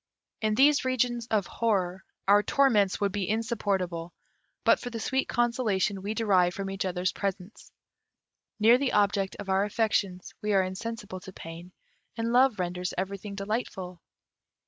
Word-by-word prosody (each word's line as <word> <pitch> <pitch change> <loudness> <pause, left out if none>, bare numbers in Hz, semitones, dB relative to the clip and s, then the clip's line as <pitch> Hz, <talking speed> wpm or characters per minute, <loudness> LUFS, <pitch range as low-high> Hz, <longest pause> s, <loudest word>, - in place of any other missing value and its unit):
In 215 -1 +1
these 280 +4 +5
regions 245 -2 0
of 210 -5 +1
horror 190 -5 -1 0.2
our 205 +1 +6
torments 210 -6 +3
would 200 -1 +1
be 195 -2 -2
insupportable, 195 -7 -1 0.5
but - - +5
for 245 - -5
the 230 -1 -5
sweet 265 +4 -1
consolation 220 -5 0
we 205 +3 -3
derive 185 -6 +3
from 195 -1 -4
each 195 0 -3
other's 180 0 0
presence. 195 0 -5 0.9
Near 230 +4 +6
the 275 -2 0
object 200 -1 +2
of 205 - -7
our 190 +1 +2
affections, 205 -4 -1
we 210 0 0
are 190 -1 +4
insensible 205 0 -5
to 190 - -11
pain, 165 +2 -10 0.5
and 230 +1 -1
love 255 -2 +5
renders 180 0 -3
everything 200 +2 -4
delightful. 195 -4 -4
205 Hz, 150 wpm, -28 LUFS, 185-230 Hz, 0.9 s, our